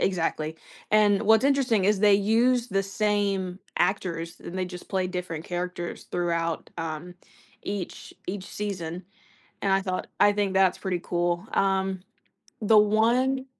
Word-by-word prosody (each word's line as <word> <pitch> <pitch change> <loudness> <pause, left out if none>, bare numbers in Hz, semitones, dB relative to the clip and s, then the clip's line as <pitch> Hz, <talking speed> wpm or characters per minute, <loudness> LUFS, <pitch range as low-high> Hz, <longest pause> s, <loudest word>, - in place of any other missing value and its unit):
exactly, 165 -3 -1 0.3
and 210 -1 +4
what's 220 +2 +5
interesting 260 -8 +3
is 205 -1 +3
they 205 -1 +6
use 230 +4 +3
the 195 -3 0
same 195 -2 -1 0.2
actors 175 -2 -1
and 185 - -6
they 185 - 0
just 180 -1 -9
play 185 -1 0
different 180 -3 -5
characters 175 0 -4
throughout, 170 -1 -1
um, 165 +2 -5 0.5
each 200 -3 -5
each 190 +1 -4
season, 180 -4 -5 0.6
and 195 - +2
I 195 - +3
thought, 185 -1 -3
"I 205 - +6
think 200 -2 0
that's 190 -1 +4
pretty 185 -2 -2
cool." 175 +2 -1
Um, 190 -1 +1 0.6
the 215 0 +4
one 235 +6 +3
190 Hz, 140 wpm, -26 LUFS, 180-210 Hz, 0.6 s, they